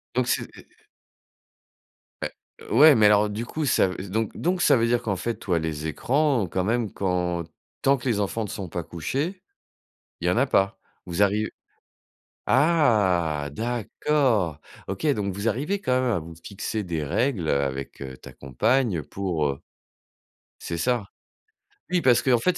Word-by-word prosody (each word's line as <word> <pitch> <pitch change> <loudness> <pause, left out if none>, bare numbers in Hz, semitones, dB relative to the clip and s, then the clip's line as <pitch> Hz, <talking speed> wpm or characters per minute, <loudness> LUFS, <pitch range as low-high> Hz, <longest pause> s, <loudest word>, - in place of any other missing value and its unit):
Donc 125 -1 +1
c'est - - +1
et - - -11
heu - - -23 1.6
Beh. - - -3 0.4
Ouais 150 -1 +8
mais 110 -2 +5
alors, 105 0 +5
du 110 +3 -4
coup, 155 +4 -3
ça 125 -7 +3
v 90 +1 -6
donc 110 +2 -2
donc 180 +1 0
ça 130 - +5
veut 115 0 +2
dire 120 0 +2
qu'en 100 -3 -1
fait, 115 +4 -2
toi, 90 -4 -1
les 80 -1 -3
écrans, 130 - +1
quand 95 - 0
même, 115 +1 0
quand 90 -2 -1 0.4
tant 140 0 +4
que 125 - -6
les 110 -4 +1
enfants 105 +3 -1
ne 105 - -5
sont 95 -4 -5
pas 85 0 -4
couchés, 145 - -3 0.8
il 90 - 0
y - - +4
en - - +1
a 135 +3 +3
pas. 100 -5 +1 0.3
Vous 90 +3 -1
arri 105 +2 +2 1.0
ah, 100 - +3
d'accord! 115 - 0 0.3
OK, 100 +10 -3
donc 100 -2 -2
vous 100 +4 -4
arrivez 160 - -1
quand 125 - -1
même 125 -1 +1
à 100 - +1
vous 80 +1 -9
fixer 105 +3 -4
des 80 -5 -3
règles, 105 - 0
heu, 70 - +2
avec 70 0 -4
heu, 65 -1 -7
ta - - -12
compagne 105 - 0
pour, 85 -3 -2
heu. 70 0 -2 1.0
C'est 85 - -4
ça. 120 +1 0 0.8
Oui, 180 -1 +2
parce 125 -3 +4
qu'en 125 -3 +3
fait, 180 +6 +1
105 Hz, 175 wpm, -25 LUFS, 85-125 Hz, 1.6 s, Ouais